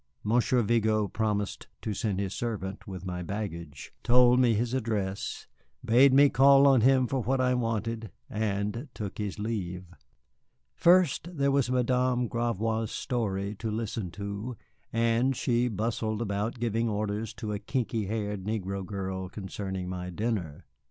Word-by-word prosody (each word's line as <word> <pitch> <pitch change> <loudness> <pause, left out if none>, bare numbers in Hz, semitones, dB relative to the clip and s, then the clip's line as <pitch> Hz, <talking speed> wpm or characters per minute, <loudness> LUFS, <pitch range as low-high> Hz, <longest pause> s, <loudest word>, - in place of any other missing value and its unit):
Monsieur 120 +3 +2
Vigo 110 -1 +2
promised 105 -1 -2 0.2
to 110 - -2
send 100 -2 -1
his 100 -1 -2
servant 105 -4 -4
with 95 -2 -7
my 90 -1 -4
baggage, 85 -6 -6
told 125 0 +5
me 120 -3 +4
his 120 +3 -1
address, 105 -6 -2 0.4
bade 125 +4 +6
me 140 +2 +7
call 140 +1 +6
on 135 -4 +6
him 130 +1 +5
for 135 +2 -1
what 130 +4 0
I 125 0 +3
wanted, 115 -2 -2 0.2
and 105 +4 -2
took 105 -1 -6
his 105 -1 -3
leave. 100 -5 -3 0.9
First, 175 - +4
there 140 0 +2
was 135 -2 +2
Madame 125 0 +1
Gravois' 115 -1 -1
story 100 -4 -2
to 110 - -3
listen 110 -3 -3
to 100 +5 -5 0.3
as 115 +3 +2
she 120 0 +1
bustled 110 0 -2
about 105 +3 -2
giving 115 0 0
orders 105 +1 -2
to 105 -3 -4
a 100 - -3
kinky 115 -1 -2
haired 105 -2 -3
negro 100 -2 -3
girl 95 -1 -4
concerning 95 -1 -5
my 90 0 -4
dinner. 90 -5 -3
110 Hz, 145 wpm, -28 LUFS, 100-120 Hz, 0.9 s, me